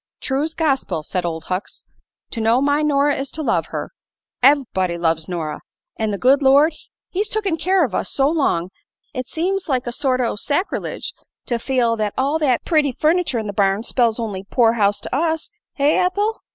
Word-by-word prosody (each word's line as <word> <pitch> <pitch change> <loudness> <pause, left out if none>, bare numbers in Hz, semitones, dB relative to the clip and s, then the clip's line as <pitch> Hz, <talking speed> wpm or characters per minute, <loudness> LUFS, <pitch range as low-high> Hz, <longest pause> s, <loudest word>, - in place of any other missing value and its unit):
"True's 295 +4 -2
gospil," 270 - 0
said 180 +2 -3
Old 165 -1 -3
Hucks. 185 +3 -5 0.5
"To 230 - -3
know 225 +3 +3
my 285 +2 +2
Nora 290 -1 +2
is 270 0 -4
to 310 - -3
love - - 0
her. - - -5 0.5
Ev'body 240 -10 +3
loves 160 -2 0
Nora. 165 -4 -4 0.3
An' 220 -1 -1
the 200 - -2
good 265 +6 +4
Lord 285 +4 +5 0.4
He's 410 +3 -2
took'n 405 -6 0
care 365 +3 +2
o' - - -4
us - - -3
so 275 0 +3
long, 230 - 0 0.4
it 255 -2 -4
seems 365 +4 -2
like 255 -3 0
a 240 - -3
sort 255 +1 0
o' 240 -2 0
sacrelidge 295 - -2 0.3
to 240 -1 -1
feel 240 -2 +1
that 210 -1 -2
all 280 +4 +1
thet 260 -6 +1
pretty 300 -5 +2
furn'ture 310 -3 +1
in 220 - -4
the 205 - -4
barn 195 +1 +1
spells 235 -2 +1
on'y 205 -5 -4
poor 230 -3 +4
house 205 -3 +2
to - - -4
us. 320 +3 -1 0.3
Eh, 285 +1 +3
Ethel?" 410 +5 0
265 Hz, 190 wpm, -20 LUFS, 215-305 Hz, 0.5 s, Lord